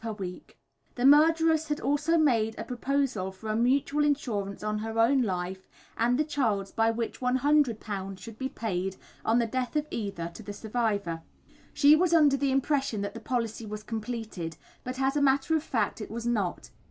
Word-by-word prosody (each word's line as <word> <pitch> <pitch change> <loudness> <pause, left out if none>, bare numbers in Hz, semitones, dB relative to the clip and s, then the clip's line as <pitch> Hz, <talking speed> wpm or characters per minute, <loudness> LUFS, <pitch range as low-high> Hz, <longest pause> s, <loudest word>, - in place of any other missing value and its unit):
per 225 -1 -3
week. 185 -3 -8 0.4
The 245 - 0
murderess 320 +2 +5
had 295 0 -1
also 295 +4 +1
made 230 -8 +2
a - - -4
proposal 255 -6 -1
for 205 +3 -9
a - - -1
mutual 275 +5 +2
insurance 215 -10 -1
on 215 0 -1
her 225 +1 -4
own 250 +4 +4
life 190 -3 -3 0.3
and 240 +2 +2
the 305 - +3
child's 220 -10 -1
by 225 0 +2
which 230 0 -3
£100 250 -7 +1
should 225 +2 -11
be 265 0 -2
paid, 195 -7 -3 0.3
on 225 - +2
the 235 - +3
death 255 +4 -3
of 300 0 +1
either, 195 -6 -4
to - - -10
the 205 -1 -7
survivor. 205 -6 -2 0.5
She 295 +1 +6
was 340 +1 +3
under 295 -4 +5
the 275 0 0
impression 270 -5 0
that 200 0 -3
the - - -7
policy 230 -3 -3
was 210 0 -6
completed, 220 -8 -5 0.3
but 255 +1 -5
as 270 +1 +1
a 290 - +2
matter 280 +3 +3
of 315 - +1
fact, 225 -6 -1
it - - -6
was 230 +1 -5
not. 210 -7 -1
235 Hz, 190 wpm, -28 LUFS, 210-280 Hz, 0.5 s, She